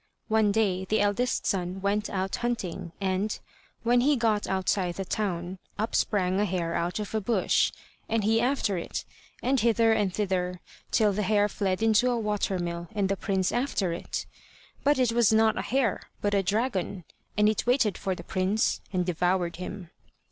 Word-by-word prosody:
One 220 -1 +3
day 195 -3 +1
the 215 +3 +1
eldest 205 +5 +1
son 185 0 -1
went 205 +2 0
out 190 0 -2
hunting, 225 -8 -3
and, 195 +2 -1 0.5
when 240 +1 +4
he 290 +3 +4
got 225 -4 +1
outside 190 -1 0
the 195 - -4
town, 185 -2 -2 0.2
up 220 +2 -2
sprang 190 -2 +1
a 210 - +3
hare 175 -3 -1
out 175 +1 -1
of 210 -1 -5
a 220 - 0
bush, 210 -2 +2 0.4
and 225 -1 +1
he 225 +2 +3
after 240 -7 +1
it, - - -5 0.4
and 265 +2 +2
hither 230 0 +4
and 205 -3 +1
thither, 180 -2 -1 0.3
till 210 -3 +3
the 210 - -1
hare 205 +1 +3
fled 195 0 -1
into 225 +3 +4
a 245 - +1
water 210 -3 -1
mill, 170 -1 -4
and 200 -2 +1
the 195 - +1
prince 190 -1 0
after 240 -8 0
it. 170 - -4 0.6
But 290 +1 +4
it 250 -3 +3
was 235 -2 +4
not 220 0 +4
a - - -1
hare, 250 -5 0 0.2
but 205 0 0
a 200 - +3
dragon, 200 -2 -1 0.3
and 210 0 +5
it 215 +2 0
waited 245 -6 +3
for 190 -2 -2
the - - -9
prince 190 +3 0
and 180 -2 0
devoured 175 0 0
him. 180 -1 -7
205 Hz, 185 wpm, -27 LUFS, 185-220 Hz, 0.6 s, and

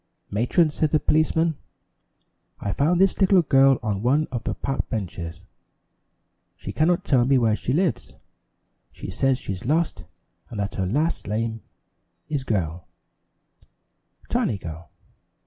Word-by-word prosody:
"Matron," 125 - +2
said 155 +1 0
the 155 - +2
policeman, 160 +1 +2 1.0
"I 100 - -2
found 160 - +2
this 195 +1 +3
little 190 -2 +5
girl 135 -2 +5
on 105 -2 -1
one 140 +7 +2
of 120 -3 -4
the - - -2
park 135 -1 -3
benches. 90 -4 -5 1.1
She - - -7
cannot 170 +3 +2
tell 130 -4 +3
me 135 +2 +3
where 115 -3 +3
she 120 - -3
lives 175 +5 0 0.8
she - - -8
says 135 -1 +1
she's 95 -7 -5
lost 160 +6 0 0.4
and 110 - -6
that 100 0 -2
her 95 -1 -2
last 150 - 0
name 110 +1 -2 0.7
is 145 -4 -2
Girl 90 -8 -2 1.4
Tiny 105 - 0
Girl. 80 -3 -9
130 Hz, 135 wpm, -24 LUFS, 100-155 Hz, 1.4 s, little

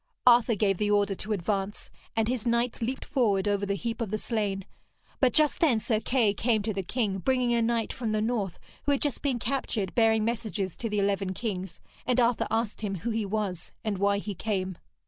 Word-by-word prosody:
Arthur 240 -1 +6
gave 195 -2 +1
the 210 - +1
order 205 -1 +3
to 205 +3 -6
advance, 200 +1 -2 0.2
and 225 -1 +2
his 245 -1 -1
knights 235 +1 +1
leaped 255 +3 -2
forward 210 -8 +1
over 200 0 +1
the 200 - 0
heap 230 +3 -3
of 225 - -1
the 215 - -1
slain. 205 -4 -2 0.5
But 255 -2 +4
just 305 +2 +2
then 270 -9 +4
Sir 220 -1 +1
Kay 230 -3 +2
came 220 0 +1
to 215 0 -1
the 195 - -1
king, 200 0 -1
bringing 250 +2 +2
a 235 - +3
knight 230 0 0
from 230 -3 -2
the 215 - +1
north 215 -5 -1 0.3
who 285 - +3
had 275 - 0
just 290 -3 -1
been 270 -4 0
captured, 230 -5 -2
bearing 220 -2 +4
messages 215 -5 -2
to 230 - -3
the 210 - -1
eleven 195 -1 0
kings, 190 -5 -4 0.2
and 250 0 +1
Arthur 240 -1 +2
asked 225 -2 -1
him 200 -2 -2
who 225 +7 -3
he 220 -2 -1
was 195 -4 -2
and 205 -3 -2
why 200 0 +3
he 205 0 -4
came. 190 -2 -2
215 Hz, 215 wpm, -28 LUFS, 200-235 Hz, 0.5 s, Arthur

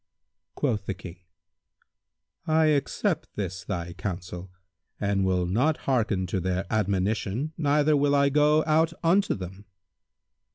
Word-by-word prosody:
Quoth 110 -9 -1
the 95 - -2
King, 90 -3 -10 1.3
"I 160 0 +4
accept 155 +3 -1
this 95 -3 -4
thy 90 -2 -4
counsel 90 -1 -6 0.5
and 100 -1 +1
will 90 -1 +1
not 125 - +1
hearken 110 -8 +1
to 95 +1 -2
their 95 +1 -1
admonition 105 +6 0
neither 150 0 +2
will 145 0 +3
I 140 0 +4
go 150 +2 +4
out 160 +1 +2
unto 185 +4 +3
them." 95 +1 -8
105 Hz, 125 wpm, -26 LUFS, 95-150 Hz, 1.3 s, I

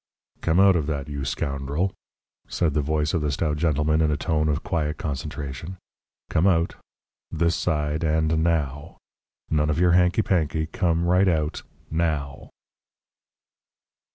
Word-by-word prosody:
"Come 85 +2 +2
out 95 -1 +6
of 80 -4 0
that, 75 -2 -3
you 70 -1 -4
scoundrel!" 70 +7 -2 0.5
said 80 -4 0
the 75 - +1
voice 75 +1 0
of 85 - +1
the 75 - 0
stout 75 +2 -1
gentleman 75 0 +1
in 80 - +3
a 75 - 0
tone 75 +1 0
of 75 0 -1
quiet 75 -2 -1
concentration. 75 0 -5 0.5
"Come 85 +5 +2
out. 85 -3 +2 0.6
This 85 +1 +1
side, 75 -1 -1
and 80 0 +1
now. 75 -2 -1 0.5
None 75 -1 +2
of 75 - 0
your 90 0 +4
hanky 90 +4 +3
panky 80 -3 0
come 85 +1 0
right 90 +2 +3
out, 80 -3 0 0.3
now." 75 -4 -2
80 Hz, 145 wpm, -24 LUFS, 75-85 Hz, 0.6 s, out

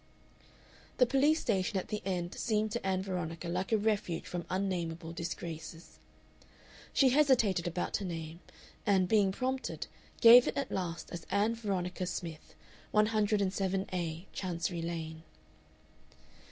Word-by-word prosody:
The 250 - +6
police 280 +5 +3
station 195 -2 0
at 185 - -3
the 210 0 -3
end 180 -2 -2
seemed 215 -2 0
to 235 - -3
Ann 190 -1 0
Veronica 175 -3 -4
like 180 +4 -2
a 220 - +5
refuge 205 -5 -1
from 175 -1 -5
unnamable 175 -3 -2
disgraces. 165 -1 -6 0.9
She 270 - +5
hesitated 245 - +3
about 175 +1 -1
her 200 - -5
name, 165 -2 -5 0.4
and, 190 -3 +3
being 200 -1 +4
prompted, 260 +5 -3 0.3
gave 240 +1 +9
it - - -2
at 275 -1 -2
last 170 -3 -3
as 170 -2 -7
Ann 205 +4 +2
Veronica 185 -5 -2
Smith, 165 -3 -6 0.4
107A, 195 -5 +1
Chancery 175 -2 -2
Lane.... 160 -1 -4
190 Hz, 125 wpm, -32 LUFS, 170-215 Hz, 0.9 s, gave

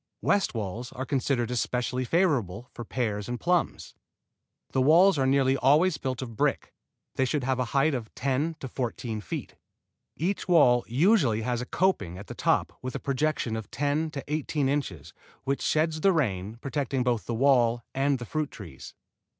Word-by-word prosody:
West 200 -10 +2
walls 110 +4 -4
are 130 - -4
considered 130 -3 0
especially 125 +1 -1
favorable 125 - 0
for 120 - -7
pears 110 -3 -3
and 120 -1 -3
plums. 175 -1 0 0.8
The 130 - +1
walls 165 +5 +5
are 135 - +2
nearly 135 0 +3
always 150 +4 +3
built 130 -1 -3
of 115 -3 -8
brick. - - 0 0.4
They 130 - +3
should 140 +2 -1
have 130 0 0
a 125 - +1
height 140 +5 +2
of 115 -4 -4
ten 140 +4 -1
to 135 - -4
fourteen 120 -3 -4
feet. 90 - -6 0.6
Each 185 +5 -2
wall 130 -9 +5
usually 135 - +3
has 120 +1 -1
a 125 - -6
coping 180 - 0
at 100 - -9
the - - -8
top - - +1
with 130 0 -5
a - - -2
projection 140 -4 -1
of 110 -3 -6
ten 145 +4 0
to 140 -3 -6
eighteen 150 -1 -1
inches, 100 - -3 0.3
which 140 +1 -1
sheds 155 0 +1
the 195 - +5
rain, 105 - -1
protecting 140 -2 -1
both 120 -3 -1
the 115 - -2
wall 120 -2 +3
and 135 +1 +1
the 120 - -7
fruit 155 +3 -2
trees. 80 -11 -11
130 Hz, 175 wpm, -27 LUFS, 120-150 Hz, 0.8 s, walls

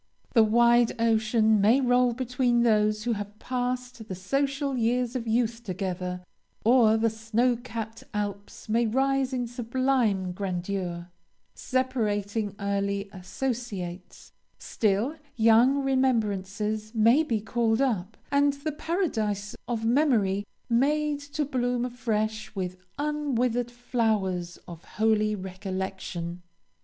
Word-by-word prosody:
The 225 - +6
wide 235 +2 +4
ocean 220 -1 +3
may 225 +6 +5
roll 250 -1 +3
between 245 -1 +1
those 215 -2 +2
who 240 0 0
have 205 0 -6
passed 250 -1 -3
the 190 - -5
social 275 - -1
years 245 +1 0
of 235 -2 -3
youth 230 +1 0
together, 180 -2 -4 0.4
or 225 -2 +5
the 225 +1 +2
snow 225 +3 +1
capped 230 -2 -7
Alps 205 0 -5
may 230 +2 +2
rise 270 +3 +1
in 250 -2 -1
sublime 240 -5 0
grandeur, 180 -2 -4 0.4
separating 215 -5 -1
early 200 0 -1
associates; 190 -3 -5 0.3
still 220 +8 0 0.2
young 235 +5 +5
remembrances 215 -4 0
may 230 +7 +5
be 235 -9 0
called 225 +1 0
up, 225 -7 -1
and 285 0 +3
the 285 +2 -4
paradise 220 - -2
of 225 -2 -2
memory 225 -7 +2 0.2
made 290 +4 +1
to 290 +1 -3
bloom 245 -2 0
afresh 220 -3 -2
with 185 -2 -3 0.2
unwithered 255 -5 0
flowers 215 -8 -1
of 170 -1 -10
holy 215 +1 +1
recollection. 185 -2 -5
225 Hz, 115 wpm, -27 LUFS, 205-250 Hz, 0.4 s, The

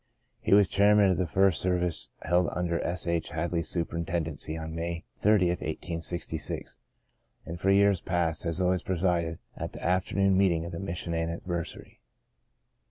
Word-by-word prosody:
He - - +4
was 100 -2 +6
chairman 100 0 +5
of 90 - +1
the 90 - 0
first 95 +1 +3
serv 90 -1 +1
ice 90 -2 -1
held 90 0 +2
under 85 -1 -1
S. 90 +1 -2
H. 85 -1 -1
Hadley's 85 0 -2
superintend 85 -1 -1
ency 80 +1 -5
on 80 0 -6
May 85 0 -3 0.2
30, 105 -4 +4
1886, 85 -2 -4 0.7
and 85 +1 -6
for 95 - +2
years 100 -1 +4
past 85 -3 0
has 85 +1 -2
always 90 0 +2
presided 85 -3 0 0.2
at - - -5
the - - -9
afternoon 95 +2 +2
meeting 90 -4 +2
of 85 - -6
the - - -5
Mission 85 -3 -4
anniversary. 85 +1 -4
85 Hz, 160 wpm, -28 LUFS, 85-95 Hz, 0.7 s, was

